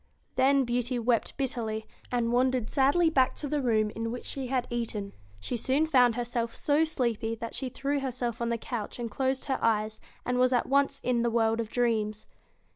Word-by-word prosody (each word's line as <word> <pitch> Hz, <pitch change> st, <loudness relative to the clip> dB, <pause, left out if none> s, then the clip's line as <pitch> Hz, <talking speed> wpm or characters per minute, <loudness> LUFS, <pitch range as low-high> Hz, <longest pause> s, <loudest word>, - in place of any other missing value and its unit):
Then 275 Hz, +1 st, +4 dB
Beauty 245 Hz, +1 st, -1 dB
wept 235 Hz, -1 st, 0 dB
bitterly, 230 Hz, -5 st, -2 dB, 0.3 s
and 235 Hz, -1 st, +1 dB
wandered 250 Hz, -2 st, +1 dB
sadly 305 Hz, +5 st, +4 dB
back 260 Hz, -4 st, +3 dB
to 295 Hz, -, -4 dB
the 290 Hz, +1 st, 0 dB
room 215 Hz, -4 st, +2 dB
in 225 Hz, +1 st, -3 dB
which 245 Hz, -, -6 dB
she 270 Hz, -2 st, -2 dB
had 255 Hz, -1 st, 0 dB
eaten. 220 Hz, -4 st, -3 dB, 0.3 s
She 100 Hz, -, -3 dB
soon 265 Hz, +6 st, +1 dB
found 250 Hz, -7 st, +4 dB
herself 240 Hz, -1 st, -2 dB
so 295 Hz, +2 st, +2 dB
sleepy 235 Hz, -7 st, -1 dB
that 230 Hz, 0 st, -6 dB
she 265 Hz, -, -3 dB
threw 280 Hz, +3 st, -1 dB
her 270 Hz, -1 st, -2 dB
self 240 Hz, -2 st, -3 dB
on 235 Hz, -, 0 dB
the 235 Hz, -, 0 dB
couch 225 Hz, -2 st, -5 dB
and 235 Hz, -2 st, -4 dB
closed 265 Hz, +3 st, -1 dB
her 270 Hz, -, -1 dB
eyes, 215 Hz, -1 st, +1 dB, 0.2 s
and 250 Hz, 0 st, 0 dB
was 255 Hz, 0 st, +4 dB
at 245 Hz, -, +2 dB
once 280 Hz, 0 st, +1 dB
in 245 Hz, -2 st, +1 dB
the 235 Hz, -, +2 dB
world 225 Hz, -1 st, +2 dB
of 225 Hz, -2 st, -2 dB
dreams. 220 Hz, -3 st, 0 dB
245 Hz, 200 wpm, -29 LUFS, 230-265 Hz, 0.3 s, Then